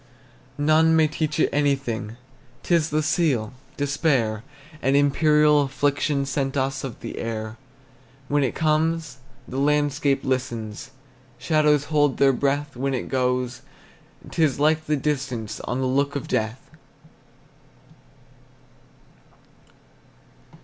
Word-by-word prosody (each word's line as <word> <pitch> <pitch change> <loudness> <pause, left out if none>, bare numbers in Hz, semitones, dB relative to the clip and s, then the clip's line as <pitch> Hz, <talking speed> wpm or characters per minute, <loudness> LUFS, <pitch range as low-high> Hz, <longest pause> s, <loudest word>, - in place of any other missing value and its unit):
None 155 +2 +4
may 160 -1 +4
teach 155 0 -2
it - - +4
anything, 135 -6 -1 0.2
' - - -30
T - - -1
is 165 -2 +3
the 155 +1 0
seal, 145 - 0 0.2
despair, 140 -7 0 0.4
An 135 +1 +2
imperial 150 +1 +4
affliction 145 0 0
Sent 135 0 -2
us 135 0 -1
of 130 -4 -7
the 115 - -6
air. 110 0 -4 0.7
When 145 0 +1
it 130 - -1
comes, 155 -2 0 0.3
the 130 - -4
landscape 145 -1 +1
listens, 125 -3 -3 0.5
Shadows 150 -3 +2
hold 145 -2 +1
their 135 -1 +4
breath; 140 +1 -1
When 135 +2 -1
it 125 - -4
goes, 125 -1 -1 0.7
't - - -3
is 145 -4 +2
like 155 +1 +2
the 150 0 +1
distance 130 -6 -3
On 125 - -2
the - - 0
look 140 +2 0
of 140 - -4
death. 110 +4 -3
140 Hz, 120 wpm, -23 LUFS, 130-150 Hz, 0.7 s, None